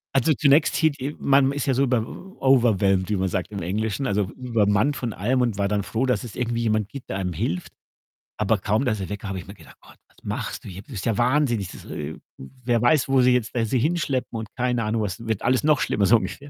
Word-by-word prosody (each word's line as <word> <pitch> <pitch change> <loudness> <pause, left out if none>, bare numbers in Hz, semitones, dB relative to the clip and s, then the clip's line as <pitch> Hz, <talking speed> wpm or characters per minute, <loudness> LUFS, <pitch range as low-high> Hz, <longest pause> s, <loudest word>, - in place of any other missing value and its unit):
Also, 135 +4 +4
zunächst 145 +1 +3
hier 160 -1 +3
die 140 +1 -5
man 135 0 +4
ist 140 0 -3
ja 135 - +3
so 135 +2 +2
bei 125 -2 +2
w - - -5
w 190 +1 -11
overwhelmed, 105 -8 +3
wie 105 - +1
man 95 0 0
sagt 90 +1 -3
im 100 -2 -5
Englischen, 110 +9 -2
also 105 -2 +1
übermannt 115 +1 +1
von 120 -4 -3
allem 125 +8 0
und 120 -5 0
war 100 - +2
dann 105 0 0
froh, 115 +6 -1
dass 125 +1 0
es 120 - -9
irgendwie 120 -1 -1
jemand 110 -2 0
gibt, 140 -2 -10
der 95 - -2
einem 90 -2 -2
hilft. 85 +2 -3 0.7
Aber 110 +1 +2
kaum, 105 +6 0
dass 115 -6 0
er 95 -3 -5
weg 105 -1 -5
war, 105 - -4
habe 95 -2 -5
mir 100 - -10
gedacht: - - -17
„Gott, - - -18
was - - -32
machst - - -4
du - - -7
hier? 95 +1 -8
Bist 105 -5 -7
ja 115 -2 0
wahnsinnig. 120 -6 +1
Das - - -11
e 75 0 -5
e - - -12 0.2
wer 120 - -2
weiß, 130 +3 +3
wo 135 -1 +4
sie 125 0 +5
jetzt 125 -2 -1
da 120 - +1
sie 120 +4 0
hinschleppen 140 -5 -1
und 110 - -6
keine 125 -2 0
Ahnung 110 +1 0
was 100 +1 -4
wird 110 -3 -2
alles 130 +2 +2
noch 150 -2 +4
schlimmer.“, 100 -2 +1
so 115 - +6
ungefähr. 140 +5 -6
115 Hz, 260 wpm, -24 LUFS, 100-130 Hz, 0.7 s, so